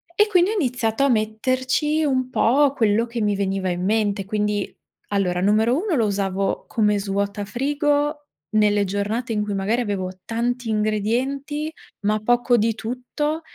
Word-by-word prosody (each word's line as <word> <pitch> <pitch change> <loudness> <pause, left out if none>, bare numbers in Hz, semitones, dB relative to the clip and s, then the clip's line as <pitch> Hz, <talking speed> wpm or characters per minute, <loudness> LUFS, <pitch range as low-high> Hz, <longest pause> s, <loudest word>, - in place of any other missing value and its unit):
e 420 +2 +4
quindi 370 -1 +3
ho - - -1
iniziato 250 - 0
a 280 - +4
metterci 255 +7 0
un 255 -3 0
po' 270 +3 +3
quello 225 -3 +2
che 235 -1 -4
mi 205 -1 +1
veniva 195 -1 -1
in 180 0 -2
mente. 205 -1 0
Quindi, 210 0 -1 0.4
allora, 185 -3 0
numero 215 +5 +3
1: 400 -6 0
lo 230 -5 +2
usavo 195 -1 -1
come 210 -2 +1
svuota 200 +1 -2
frigo 290 - 0 0.2
nelle 210 -1 +3
giornate 210 +5 -2
in 210 -1 0
cui 205 -1 -3
magari 215 +6 0
avevo 195 -4 -2 0.2
tanti 235 +1 -2
ingredienti, 250 +8 -1 0.3
ma 210 +1 +1
poco 240 +2 +2
di 225 0 +1
tutto 255 +8 -3
225 Hz, 155 wpm, -22 LUFS, 205-260 Hz, 0.4 s, e